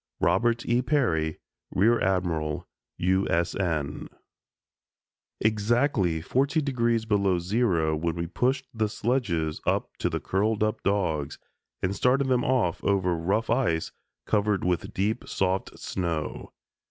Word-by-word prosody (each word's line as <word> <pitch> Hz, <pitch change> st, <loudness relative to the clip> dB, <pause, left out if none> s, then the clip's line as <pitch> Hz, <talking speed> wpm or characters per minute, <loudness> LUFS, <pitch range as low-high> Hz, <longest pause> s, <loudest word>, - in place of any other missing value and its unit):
"Robert 115 Hz, +9 st, +2 dB
E. 120 Hz, +1 st, +2 dB
Peary, 90 Hz, -, +1 dB, 0.3 s
Rear 115 Hz, +5 st, +3 dB
Admiral, 85 Hz, -5 st, -1 dB, 0.3 s
U. 95 Hz, +2 st, +1 dB
S. 85 Hz, -1 st, +1 dB
N." 80 Hz, -7 st, -2 dB, 1.3 s
Exactly 105 Hz, -, +1 dB
40° 125 Hz, -, +1 dB
below 100 Hz, -4 st, +2 dB
zero 85 Hz, -4 st, +1 dB
when 80 Hz, +1 st, -1 dB
we 85 Hz, 0 st, -2 dB
pushed 130 Hz, +10 st, 0 dB
the 110 Hz, -2 st, 0 dB
sledges 105 Hz, -, -1 dB
up -, -, 0 dB
to -, -, 0 dB
the -, -, -2 dB
curled 105 Hz, +3 st, 0 dB
up 110 Hz, 0 st, -1 dB
dogs 80 Hz, -8 st, 0 dB, 0.5 s
and 95 Hz, +1 st, 0 dB
started 130 Hz, +5 st, +2 dB
them 125 Hz, -1 st, +2 dB
off 125 Hz, -10 st, +1 dB
over 95 Hz, -3 st, +2 dB
rough 100 Hz, +8 st, 0 dB
ice 115 Hz, -10 st, +1 dB, 0.3 s
covered 105 Hz, -1 st, +1 dB
with 90 Hz, -2 st, -1 dB
deep 105 Hz, +5 st, -1 dB
soft 95 Hz, 0 st, -1 dB
snow. 85 Hz, -4 st, -3 dB
100 Hz, 125 wpm, -27 LUFS, 85-115 Hz, 1.3 s, Rear